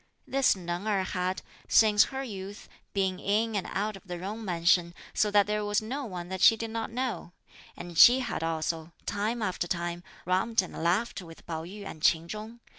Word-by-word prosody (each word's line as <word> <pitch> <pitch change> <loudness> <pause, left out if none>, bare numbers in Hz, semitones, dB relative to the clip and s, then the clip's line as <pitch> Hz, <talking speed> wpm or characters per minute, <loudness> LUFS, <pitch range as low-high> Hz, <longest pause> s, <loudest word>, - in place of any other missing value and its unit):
This 270 -4 +3
Neng 175 +2 -4
Erh 200 -3 +1
had, 185 0 -2 0.2
since 210 -2 +6
her 270 0 -5
youth, 200 -4 -7 0.2
been 190 -2 0
in 220 +2 0
and 195 -3 -1
out 210 +2 -2
of 195 - -11
the 175 -1 -4
Jung 205 +5 -5
mansion, 170 -1 +2 0.2
so 210 - +2
that 205 -1 +4
there 210 +1 -1
was 205 0 +1
no 260 +6 -4
one 180 -5 -6
that 190 0 -4
she 225 - +7
did 225 0 -4
not 225 0 -3
know; 240 -7 -3 0.4
and 175 -1 -8
she 245 +9 +8
had 245 - -3
also, 165 0 -2
time 215 +3 -1
after 185 -3 -1
time, 175 0 -2 0.2
romped 190 +4 +2
and 185 - -9
laughed 190 +7 0
with 165 -2 -13
Pao 160 -1 -4
yü 200 +3 -9
and 155 - -8
Ch'in 165 +1 +3
Chung. 215 +5 -8
195 Hz, 195 wpm, -29 LUFS, 175-220 Hz, 0.4 s, she